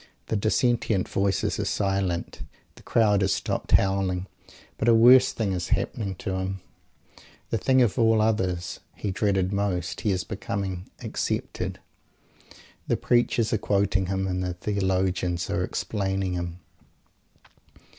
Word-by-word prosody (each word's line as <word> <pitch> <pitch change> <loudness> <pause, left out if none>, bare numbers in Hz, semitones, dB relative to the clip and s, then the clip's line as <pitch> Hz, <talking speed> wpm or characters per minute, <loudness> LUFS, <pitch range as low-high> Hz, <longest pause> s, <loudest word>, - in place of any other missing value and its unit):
The - - 0
dissentient 110 -1 +1
voices 100 -1 0
are - - 0
silent. 95 -3 -1 0.3
The - - -17
crowd 105 -3 +2
has 95 0 +2
stopped - - -3
howling. 95 -1 +2 0.5
But 110 - 0
a 115 - +6
worse 125 +3 +7
thing 105 -4 -1
is 90 -1 -3
happening 100 -3 -1
to 95 +1 -3
him, 95 +1 -3 0.9
the 115 - +1
thing 130 +4 +4
of 120 +1 0
all 115 -1 +4
others 90 -6 0 0.2
he 100 - -3
dreaded 95 -1 0
most; 95 -4 -2
he 110 - 0
is 95 -2 0
becoming 95 -3 -4
"accepted" - - -3 1.1
The - - +1
preachers 120 -2 +1
are 110 - +1
quoting 100 -2 +1
him 95 0 -1
and 90 -1 -2
the 90 -1 -3
theologians 95 -2 -1
are - - 0
explaining 95 -3 -2
him. 85 0 -4
95 Hz, 135 wpm, -26 LUFS, 95-105 Hz, 1.1 s, worse